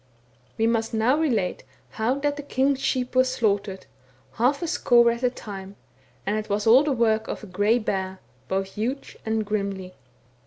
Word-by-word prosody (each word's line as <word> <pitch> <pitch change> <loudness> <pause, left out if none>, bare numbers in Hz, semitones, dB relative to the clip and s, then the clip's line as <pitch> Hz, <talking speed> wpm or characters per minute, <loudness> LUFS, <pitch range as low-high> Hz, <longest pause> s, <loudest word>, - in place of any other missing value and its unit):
We 225 - +2
must 225 -1 0
now 225 +5 +3
relate 230 - 0 0.3
how 225 - 0
that 290 0 0
the 290 - -5
king's 275 -1 +1
sheep 255 -1 -1
were 255 - +6
slaughtered, 205 -6 -1 0.5
half 265 +8 +1
a - - -1
score 240 -8 +4
at 235 +1 -4
a 250 - +3
time, 200 -5 -9 0.5
and 205 +2 0
it 215 - -4
was 205 +1 0
all 235 +4 +7
the 300 - 0
work 225 -3 +1
of - - -5
a - - -6
grey 205 +4 +2
bear, 190 -4 -3 0.3
both 195 0 -2
huge 250 +6 -4
and 220 -1 0
grimly. 200 -3 -3
225 Hz, 180 wpm, -25 LUFS, 205-255 Hz, 0.5 s, all